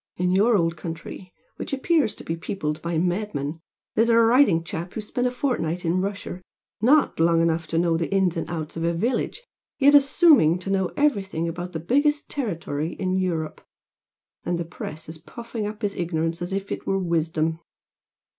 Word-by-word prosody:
In 180 0 +1
your 210 +4 +4
old 165 -2 0
country, 165 +3 -7 0.3
which - - -5
appears 275 - +1
to - - -9
be 165 - -3
peopled 155 -3 -4
by 170 -1 -2
madmen, 170 -4 -1 0.3
there's 225 +2 +3
a 230 - +5
writing 230 -7 +5
chap 170 +1 -6
who - - -2
spent 245 +4 -1
a - - +2
fortnight 185 - -2
in 175 +3 +1
Russia, 195 -2 -4 0.4
not 280 - +4
long 165 0 +4
enough 165 -1 +1
to 165 - -2
know 165 -1 +2
the 165 +2 -2
ins 190 -3 +2
and 165 - -3
outs 160 -2 -5
of 165 - -3
a 170 0 +1
village, 240 - -1 0.3
yet 285 +1 +5
assuming 280 - +6
to 190 +2 -5
know 190 -1 +2
everything 200 - +1
about 175 +2 -5
the 160 - -3
biggest 285 - +1
territory 170 - -3
in 185 -2 -2
Europe, 175 -4 -1 0.8
and 175 - -1
the 170 - -3
press 155 -1 -8
is 160 0 -8
puffing 230 +4 -6
up 215 +1 -8
his 200 -1 0
ignorance 165 -2 -2
as 175 +2 -3
if 195 +1 -3
it - - -5
were 195 - +1
wisdom. 165 -2 0
180 Hz, 185 wpm, -24 LUFS, 165-220 Hz, 0.8 s, assuming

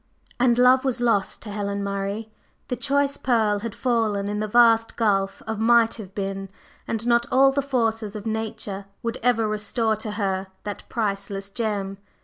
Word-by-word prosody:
And 240 -1 +4
Love 255 +1 +6
was 260 -3 -1
lost 230 -5 +1
to 210 - -7
Helen 200 -1 -2
Murray; 200 +2 -3 0.4
the 250 - 0
choice 280 +1 +1
pearl 220 -5 +2
had 225 0 -5
fallen 220 -5 0
in 210 0 -2
the 215 - -1
vast 230 0 +4
gulf 195 -3 0
of 220 -1 -3
Might 230 0 +4
have 195 -4 -10
been, 195 -1 -3 0.4
and 225 0 -2
not 235 0 +3
all 270 +1 +6
the 280 +1 0
forces 225 -6 -1
of 210 0 -6
Nature 215 -3 -3 0.2
would 230 -1 -2
ever 230 -2 +2
restore 220 +1 0
to 215 0 -5
her 195 -2 -1 0.2
that 205 -1 -7
priceless 200 -2 -3
gem. 200 -3 -2
220 Hz, 170 wpm, -24 LUFS, 200-235 Hz, 0.4 s, Love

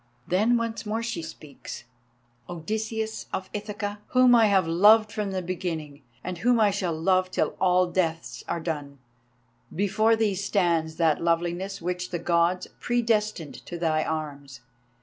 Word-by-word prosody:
Then 215 +7 +3
once 230 -1 -3
more 220 +1 -2
she 225 -7 -3
speaks: 155 -6 -9 0.7
"Odysseus 220 +6 -3
of 190 0 -4
Ithaca, 205 0 -4
whom 255 -1 +5
I 230 -2 +6
have 190 -4 +3
loved 210 +6 +5
from 210 -2 -2
the 190 -1 -3
beginning, 165 -5 -4 0.2
and 180 -1 -5
whom 240 +3 +3
I 210 -2 +4
shall 180 -5 -2
love 185 +2 +2
till - - -1
all 185 0 +4
deaths 170 -2 -2
are 170 - -2
done, 145 -4 -4 0.7
before 215 +4 +2
thee 220 -2 +1
stands 175 -5 0
that 160 -3 +2
Loveliness 175 +3 -1
which 180 +1 -3
the 175 - -2
Gods 170 +1 +1
predestined 215 -8 -1
to 175 - -5
thy 160 -2 +1
arms. 145 -5 -5
185 Hz, 150 wpm, -26 LUFS, 165-210 Hz, 0.7 s, I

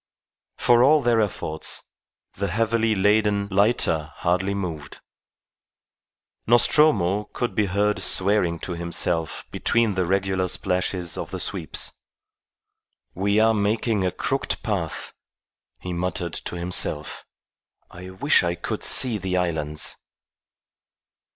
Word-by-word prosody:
For 120 0 +4
all 150 +2 +5
their 115 -2 +3
efforts, 80 -6 -1 0.5
the 100 +1 -3
heavily 115 +3 +1
laden 105 0 +2
lighter 95 -7 +1
hardly 95 +3 0
moved. 85 -7 -6 1.5
Nostromo 110 - +3
could 120 - -2
be 105 -1 +1
heard 100 +2 0
swearing 95 -3 +3
to - - -5
himself 85 -1 -1
between 115 -3 +1
the 95 -2 -1
regular 95 0 0
splashes 90 -2 -2
of - - -5
the - - -5
sweeps. - - -1 1.2
"We 100 +3 +1
are 110 +1 +4
making 105 0 0
a 90 - +1
crooked - - -3
path," - - -3 0.7
he 90 - -6
muttered 85 -1 -3
to - - -5
himself. 85 -4 -4 0.7
"I 90 +1 -10
wish 135 +11 +3
I 85 0 -1
could 85 - -5
see 120 -5 +4
the 90 -1 -2
islands." 80 -4 -2
95 Hz, 115 wpm, -23 LUFS, 90-110 Hz, 1.5 s, all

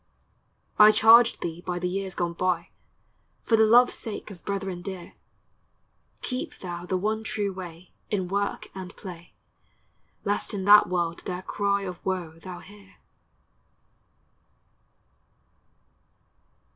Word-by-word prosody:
I 210 0 +10
charge 225 +2 +6
thee 170 0 -4
by 180 0 -3
the 180 0 -1
years 190 0 -3
gone 170 -1 -1
by, 175 -1 -1 0.7
For 230 - +3
the 220 0 +5
love's 245 +3 +6
sake 215 -1 -5
of 180 -4 -12
brethren 195 -3 -3
dear, 185 -1 -7 1.1
Keep 255 0 -4
thou 175 -1 -7
the 185 - 0
one 215 +3 -1
true 210 -3 -2
way, 180 -1 -9 0.2
In 190 -4 -1
work 200 +2 -2
and 185 -1 -8
play, 175 -3 -10 0.9
Lest 205 0 -1
in 190 -2 -3
that 210 +1 +8
world 170 -2 -1
their 180 0 -4
cry 200 0 0
Of 180 -2 -7
woe 175 -4 -3
thou 180 0 -9
hear. 200 0 -16
190 Hz, 125 wpm, -26 LUFS, 180-205 Hz, 1.1 s, I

